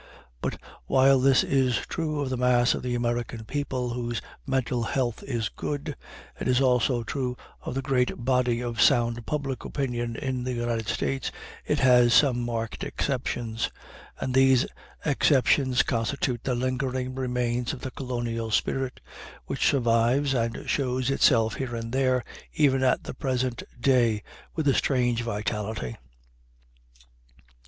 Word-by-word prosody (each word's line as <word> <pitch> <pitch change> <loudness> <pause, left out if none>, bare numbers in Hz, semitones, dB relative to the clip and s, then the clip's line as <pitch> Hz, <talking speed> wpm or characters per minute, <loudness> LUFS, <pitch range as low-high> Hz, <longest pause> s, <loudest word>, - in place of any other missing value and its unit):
But - - -3 0.3
while 135 0 +5
this 135 0 +5
is 130 -3 +2
true 155 -3 -2
of 135 -2 -2
the - - 0
mass 125 -1 +3
of - - -4
the 125 -1 -2
American 120 -1 -2
people 130 -2 -2
whose 120 -1 -2 0.3
mental 130 -2 0
health 120 0 -1
is 115 -6 -2
good, 145 -1 -4 0.4
and - - -2
is 125 0 +4
also 125 -2 +2
true 125 +1 -3 0.2
of - - -5
the 135 - -2
great 125 -2 +2
body 125 -2 +2
of 115 -3 -2
sound 120 +1 +3
public 140 -3 -2
opinion 120 -4 -2
in 130 -1 -3
the 125 0 -2
United 120 -2 -2
States, 135 +5 -1 0.4
it - - +2
has 125 -2 +6
some 130 -5 +4
marked 115 -1 -3
exceptions; 120 -4 -2 0.5
and 130 - -2
these 130 -1 +5 0.4
exceptions 135 -3 +3
constitute 120 +1 -1
the 125 - +1
lingering 130 0 -2
remains 125 -2 -1
of 135 - -7
the 130 - -5
colonial 120 -4 -3
spirit, 130 +4 -1 0.4
which - - 0
survives, 125 +2 +2
and 115 -2 -2
shows 130 -1 0
itself 115 -5 +4
here 125 -3 -3
and 115 0 -5
there 130 -2 +2 0.3
even 135 -3 +3
at 130 -1 +2
the - - -6
present 130 -2 -1 0.2
day, 120 -5 +3 0.3
with 160 -3 -1
a 135 - +5
strange 120 -4 +1
vitality. 105 - -3
125 Hz, 145 wpm, -26 LUFS, 120-135 Hz, 0.5 s, has